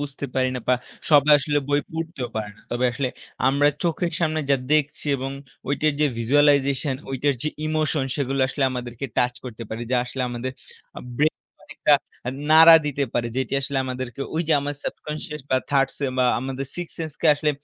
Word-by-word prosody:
বুঝতে 140 -1 -5
পারি 130 0 +2
না, 125 - -3
বা 125 - +6 0.4
সবাই 150 0 +6
আসলে 145 +1 0
বই 145 0 +3
পড়তেও 160 -6 -4
পারে 105 -1 -3
না। - - -20
তবে 120 +1 0
আসলে 130 +1 -1 0.4
আমরা 140 +2 +4
চোখের 170 0 0
সামনে 155 -1 +1
যা 140 - +6 0.2
দেখছি 150 -1 +1
এবং 135 +1 -4 0.4
ঐটার 150 +2 +2
যে 150 - +5
visualization 140 +2 +3 0.2
ঐটার 135 +2 +1
যে 155 - 0 0.2
ইমোশন, 155 -2 0
সেগুলো 135 -1 -1
আসলে 135 +1 0
আমাদেরকে 125 +1 -5
টাচ 125 0 +2
করতে 120 -2 -7
পারে। 110 - -5
যা 130 - +3
আসলে 130 +1 -4
আমাদের 120 +2 -4 0.5
আ - - -9 0.2
ব্রেইনে 150 +3 -2
একটা - - +3 0.3
আ - - -1 0.2
নাড়া 165 +1 +10
দিতে 145 -1 0
পারে, 120 -1 +1
যেটি 130 -2 -2
আসলে 135 +1 -4
আমাদেরকে 130 0 -5
ওই 165 - +1
যে - - +4
আমার 145 +1 -3
subconscious 150 -1 -5
বা 130 - +4
থার্ড 135 -1 +3
সে 145 - -2
বা 130 - +4 0.2
আমাদের 135 +1 -4
6th 175 -1 -6
সেন্স 160 -2 -4
কে - - +2
আসলে 150 +1 +1
140 Hz, 190 wpm, -23 LUFS, 130-150 Hz, 0.5 s, নাড়া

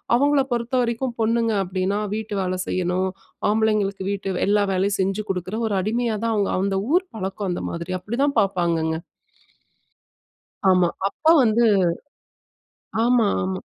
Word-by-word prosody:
அவங்கள 285 +2 +3
பொறுத்த 235 +1 -1
வரைக்கும் 235 +1 -2
பொண்ணுங்க 230 0 +1
அப்பிடின்னா, 190 +2 -1 0.2
வீட்டு 215 -1 -4
வேலை 185 0 -2
செய்யணும், 185 +1 0 0.4
ஆம்பளைங்களுக்கு 210 -3 +1
வீட்டு 195 -2 -3
எல்லா 205 0 +3
வேலையும் 195 +2 +1
செஞ்சு 195 +3 -1
குடுக்குற 185 +2 -3
ஒரு 210 - -1
அடிமையாதான் 225 +1 -1
அவுங்க 200 -1 +1
அந்த 195 0 0
ஊர் 360 +2 +2
பழக்கம் 195 -1 -3
அந்த 175 - -3
மாதிரி. 170 +2 -5
அப்பிடி 215 +7 -5
தான் 280 -4 -1
பாப்பாங்கங்க. 170 -5 0 1.7
ஆமா 180 -2 +4 0.2
அப்ப 200 - -24 0.2
வந்து 235 0 +3 1.4
ஆமா, 240 -2 +4 0.2
ஆமா. 95 0 -2
205 Hz, 130 wpm, -23 LUFS, 185-230 Hz, 1.7 s, ஆமா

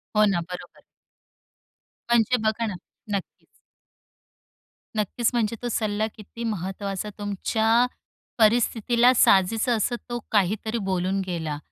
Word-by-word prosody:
हो, 215 0 +6
ना, 195 -4 +1
बरोबर. 180 - -9 1.3
म्हणजे 235 +1 +4
बघा 220 +2 0
ना 210 - -3 0.4
नक्कीच. 190 - -10 1.5
नक्कीच. 215 +3 +1
म्हणजे 230 -2 0
तो 245 - -3
सल्ला 215 -1 0
किती 220 +2 -9
महत्त्वाचा, 195 -1 -3
तुमच्या 220 +3 +2 0.5
परिस्थितीला 235 +2 +4
साजेसं 225 +2 +4
असं 240 +3 0
तो 240 0 -2
काहीतरी 215 +3 +1
बोलून 185 +1 0
गेला. 160 -5 -3
215 Hz, 110 wpm, -25 LUFS, 195-235 Hz, 1.5 s, हो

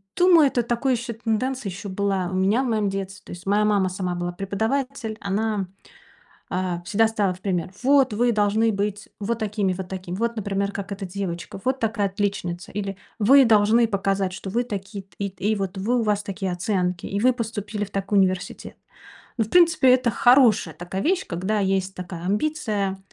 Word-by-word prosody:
думаю, 350 -4 +6
это 245 -3 0
такая 240 +3 0
ещё 235 0 -4
тенденция 230 +1 -2
ещё 195 +2 -7
была 190 -2 -1
у - - -3
меня 200 +7 +2
в - - -2
моём 215 -4 +1
детстве. 195 +1 -5
То - - -11
есть 175 +1 -9
моя 205 +2 +3
мама 200 -3 +2
сама 180 -1 -3
была 175 0 -3
преподаватель, 220 +5 -2
она, 205 0 -1 0.8
э, 180 -2 -2
всегда 220 +4 +3
ставила 205 -4 0
в 180 - -14
пример: 180 -2 -2
"Вот 270 -3 +4
вы 240 +3 +2
должны 215 +2 +2
быть 205 +1 -2
вот 230 +3 -2
такими, 210 -3 0
вот 185 0 -6
такими. 185 -1 -6
Вот, 235 +3 -1
например, 200 -2 -1
как 200 0 -6
эта 200 0 -4
девочка. 180 -2 -5
Вот 260 +1 0
такая 220 -2 0
отличница". 190 -3 -3
Или: 195 -1 -4 0.2
"Вы 270 +6 +7
должны 225 +1 +4
показать, 195 -2 0
что 195 - -6
вы 240 +3 +1
такие 200 -3 -6
т 185 -2 -28
и 200 -1 -2
т 185 -1 -15
и 215 +1 +3
вот 195 -1 -3
вы, 235 +6 +1
у - - 0
вас 210 -1 0
такие 195 -2 -3
оценки, 180 -1 -1
и 200 - -2
вы 255 +3 +5
поступили 210 -3 -4
в - - -15
такой 195 +1 +1
университет". 185 -1 -1 0.6
Но, 225 - +3
в 215 - -12
принципе, 330 -7 +5
это 255 -2 +2
хорошая 245 -1 +4
такая 180 +2 -5
вещь, 370 +3 +1
когда 190 +5 -1
есть 190 -1 0
такая 175 -2 -7
амбиция, 205 -3 -1
205 Hz, 195 wpm, -24 LUFS, 190-225 Hz, 0.8 s, Вы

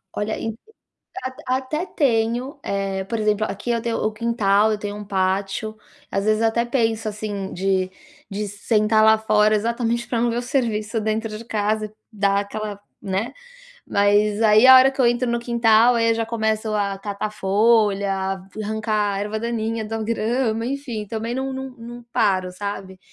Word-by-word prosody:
Olha, 210 +1 -2
e 225 -1 -3 0.7
at 260 0 -4
até 265 +7 -1
tenho 245 -1 0
eh, 195 -1 -2
por 230 +3 -3
exemplo, 215 0 +1
aqui 205 +5 -3
eu 230 -1 0
tenho 230 -1 -2
o 215 - 0
quintal, 215 -2 +2
eu - - -2
tenho 205 0 -5
um 210 - -7
pátio. 195 +2 -1 0.4
Às 195 +1 -1
vezes, 215 0 +2
eu - - +5
até 235 +1 0
penso, 225 -3 0
assim, 205 -2 -5
de 190 0 0 0.4
de 205 +1 -3
sentar 215 +1 +2
lá 220 0 +6
fora, 215 0 +3
exatamente, 235 +2 -1
para 235 - -1
não 240 - +2
ver 230 - -1
o - - 0
serviço 230 -4 -1
dentro 215 0 -2
de 230 - -10
casa, 215 -1 -1 0.2
dar 200 -2 +1
aquela 205 0 -6 0.2
né. 195 +4 -2 0.6
Mas 205 +1 +2
aí 215 +2 +6
a 260 0 +10
hora 260 +1 +7
que 270 - -4
eu 250 - +5
entro 240 +1 +1
no 235 - 0
quintal, 235 0 +4
aí 230 0 +3
eu - - +3
já 225 0 -1
começo 220 -1 -1
a 200 -2 -1
catar 205 +1 -4
folha, 205 -1 +2 0.5
arrancar 215 -1 -1
a - - -2
erva 210 +1 -3
daninha 225 -1 -2
da 225 +1 -4
grama, 230 +1 0
enfim, 250 -6 -4
também 225 +3 -4
não 265 +1 -2
não 265 0 -5
não 240 0 -10
paro, 185 -4 +1
sabe. 190 -1 -6
220 Hz, 180 wpm, -22 LUFS, 205-235 Hz, 0.7 s, a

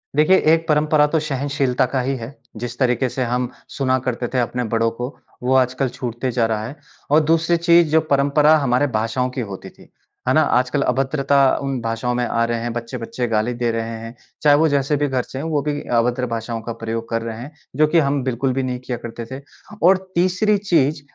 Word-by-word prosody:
देखिए 155 +6 +5 0.2
एक 165 0 0
परंपरा 150 0 +3
तो 160 - +4
सहनशीलता 140 -3 0
का 130 +1 -1
ही 135 +2 -1
है। 120 +5 -8 0.2
जिस 120 +1 -6
तरीके 125 0 +1
से 130 - -2
हम 125 +1 -1 0.3
सुना 130 -1 +2
करते 125 -1 -3
थे 130 - +2
अपने 125 +1 -1
बड़ों 115 0 +2
को 125 +3 -4 0.3
वो 130 +1 +1
आजकल 130 +1 +2
छूटते 120 +1 -4
जा 115 -1 +1
रहा 110 -1 -2
है। 135 - -8 0.4
और 155 - +6
दूसरी 165 +1 +3
चीज़ 170 -1 +4
जो 160 - +4
परंपरा 145 +3 +4
हमारे 140 0 +1
भाषाओं 115 +2 -1
की 125 0 -4
होती 100 -4 -7
थी, - - -19 0.4
है - - +3
ना? - - +5
आजकल 125 +3 +1
अभद्रता 135 0 +2
उन 135 -2 -2
भाषाओं 115 +2 -2
में 125 0 0
आ 115 0 0
रहे 115 0 -2
हैं, 120 0 -3
बच्चे-बच्चे 120 +1 -4
गाली 115 +2 0
दे 120 -1 -1
रहे 115 0 -3
हैं। 115 +1 -9 0.3
चाहे 145 -1 +6
वो 160 +1 +4
जैसे 140 +1 +1
भी 145 0 +1
घर 130 -2 -1
से 130 - -9
हैं 150 - -4
वो 150 -3 0
भी 145 0 -2 0.2
अभद्र 125 +2 +1
भाषाओं 115 0 -4
का 115 +1 -5
प्रयोग 115 0 -4
कर 115 0 -1
रहे 115 -1 -5
हैं, 140 - -8 0.2
जो 155 +2 +4
कि 165 +1 +3
हम 140 -2 +1
बिल्कुल 130 +1 -1
भी 135 - -1
नहीं 125 -1 -3
किया 125 -1 -5
करते 115 0 -7
थे। 135 +2 -6 0.4
और 185 +2 +6 0.2
तीसरी 185 +4 +2
चीज़ 155 -7 +1
130 Hz, 220 wpm, -20 LUFS, 120-145 Hz, 0.4 s, और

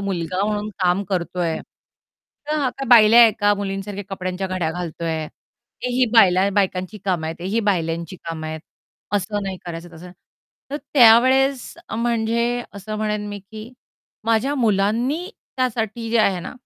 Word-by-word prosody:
मुलगा 185 -1 -2
म्हणून 210 0 -2
काम 180 +2 +2
करतोय. 175 -3 -1 0.9
तर, 305 - 0
आता 270 0 -2
बायल्याा 230 -1 +8
आहे 225 -2 +6
का? 205 0 +4
मुलींसारख्या 200 0 -5
कपड्यांच्या 185 -1 -4
घड्या 185 -4 -2
घालतोय. 165 -2 -4 0.6
तेही 250 +1 +2
बायला 195 -3 +5
बायकांची 190 0 -1
कामं 175 -5 -1
आहेत, 160 - -4
तेही 195 +6 -1
बायल्यांची 170 -3 -1
कामं 160 -1 -5
आहेत, 160 0 -5 0.5
असं 205 +1 -1
नाही 190 -1 -4
करायचं 170 +1 -7
तसं 180 +2 -11 0.6
तर 290 - -2 0.2
त्यावेळेस, 260 +2 +5 0.2
म्हणजे 235 +1 0
असं 215 +2 -6
म्हणेन 210 -1 -2
मी, 205 0 -6
की 215 +4 -11 0.5
माझ्या 230 +5 +1
मुलांनी 235 - +1 0.3
त्यासाठी 230 -2 -2
जे 235 - +2
आहे 195 -4 +2
ना, - - -7
205 Hz, 140 wpm, -21 LUFS, 180-230 Hz, 0.9 s, बायल्याा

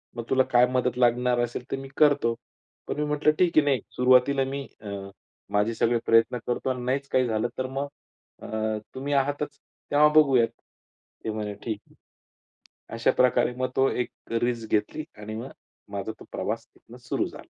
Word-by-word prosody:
मग 120 - -4
तुला 130 0 +4
काय 125 0 +6
मदत 125 -1 0
लागणार 125 0 +3
असेल, 120 +1 -2
तर 135 - 0
मी 135 0 -7
करतो." 145 -6 +4 0.5
पण - - -3
मी 150 - +1
म्हटलं, 150 +1 +2
"ठीक 175 -3 +3
आहे, 155 - +7
नाही. 135 -6 +2 0.2
सुरुवातीला 130 +2 +5
मी 140 +1 -4 0.2
अ, 105 - -7 0.6
माझे 105 +3 +2
सगळे 120 +1 +2
प्रयत्न 115 +2 +4
करतो 125 +2 -1
आणि 125 -1 -4
नाहीच 135 +2 -1
काही 130 -1 +2
झालं, 110 +1 0
तर 130 - -1
मग 140 +1 -1 0.5
अ, - - -8 0.5
तुम्ही 140 +2 -3
आहातच 145 +1 0 0.3
तेव्हा 150 +1 +6
बघूयात." 135 -6 +5 0.8
ते - - -1
म्हणे, 105 -1 -3
"ठीक 110 -3 -3
आहे." - - -23 1.0
अशाप्रकारे 125 +1 +3
मग 130 0 -1
ती 135 -1 +2
एक 125 - -4 0.3
रिस्क 115 -2 -1
घेतली 105 +8 0 0.2
आणि 105 +1 -6
मग 120 +4 -6 0.4
माझा 100 +2 -3
तो - - -12
प्रवास - - -3
तिथून - - -16
सुरू - - +1
झाला. - - -9
125 Hz, 175 wpm, -26 LUFS, 115-140 Hz, 1.0 s, आहे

